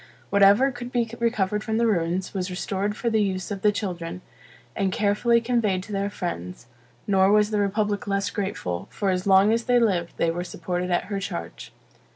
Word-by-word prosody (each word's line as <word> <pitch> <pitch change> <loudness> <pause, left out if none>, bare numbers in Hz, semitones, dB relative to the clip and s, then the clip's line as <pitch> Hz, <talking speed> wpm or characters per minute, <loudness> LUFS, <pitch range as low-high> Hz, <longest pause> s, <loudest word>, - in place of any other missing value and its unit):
Whatever 200 +7 +5
could 245 -1 -8
be 235 -2 0
recovered 210 -3 0
from 220 -1 -1
the 235 - +2
ruins, 180 -3 0
was 190 -1 -2
restored 195 +3 -2
for 235 - -1
the 220 -1 +2
use 190 -1 -2
of 200 -1 -4
the 210 - +4
children, 180 -4 -5 0.5
and 195 -1 0
carefully 215 +4 +2
conveyed 225 -6 0
to 210 - -11
their 200 0 -1
friends; 120 - -5 0.4
nor 195 -1 +4
was 210 0 +3
the 210 - +1
republic 205 0 0
less 200 0 0
grateful; 190 - -3
for 200 -2 -1
as 185 +1 -2
long 195 +2 +5
as 230 0 -1
they 245 0 +3
lived, 185 -7 +1
they 165 - +1
were 175 +1 -3
supported 180 +1 -4
at 175 - +1
her 200 - -1
charge. 85 - -6
200 Hz, 195 wpm, -24 LUFS, 185-215 Hz, 0.5 s, Whatever